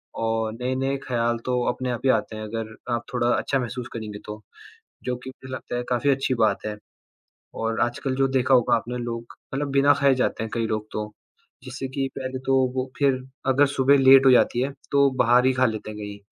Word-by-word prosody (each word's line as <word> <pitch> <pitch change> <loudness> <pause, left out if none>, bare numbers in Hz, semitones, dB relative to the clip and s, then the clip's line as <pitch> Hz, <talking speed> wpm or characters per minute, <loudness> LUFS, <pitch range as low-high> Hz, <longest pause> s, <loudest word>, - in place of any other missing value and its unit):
और 115 -1 -1
नए-नए 130 +3 -1
ख्याल 120 -1 0
तो 125 -1 0
अपने 125 +1 -2
आप 120 - -4
ही - - +4
आते 110 -1 -1
हैं, 110 - -6
अगर 110 0 -5 0.2
आप 120 0 -1
थोड़ा 120 -1 +1
अच्छा 135 - 0
महसूस 125 0 -4
करेंगे 105 -3 -6
तो, 105 0 -8 0.6
जो 125 -1 -1
कि 125 +1 -9
मुझे 130 0 -12
लगता 130 - -5
है 120 - -1
काफ़ी 125 +3 +2
अच्छी 135 -1 +1
बात 110 -3 +1
है। 105 -1 -4 0.9
और 115 0 -1
आजकल 125 +2 -1
जो 135 0 +2
देखा 130 0 +2
होगा 120 -2 +4
आपने 120 +2 -3
लोग 120 -1 -4 0.3
मतलब 140 +1 -2
बिना 140 +1 +5
खाए 140 -1 +5
जाते 125 -3 -1
हैं 110 - -5
कई 115 -1 0
लोग 110 -1 -3
तो, 105 0 -4 0.5
जिससे 130 +1 -6
कि 135 -1 0
पहले 130 -1 -4
तो 135 - +4 0.2
वो 130 0 -2
फिर 135 -2 +2 0.3
अगर 135 +2 +5
सुबह 140 +1 +4
लेट 135 0 +7
हो 135 - +8
जाती 125 -1 +4
है, 135 +2 -1 0.2
तो 140 0 +5
बाहर 125 +2 +4
ही 130 - +3
खा 130 0 +2
लेते 110 -2 -3
हैं 105 - -9
कहीं, 105 0 -7
125 Hz, 215 wpm, -24 LUFS, 115-135 Hz, 0.9 s, हो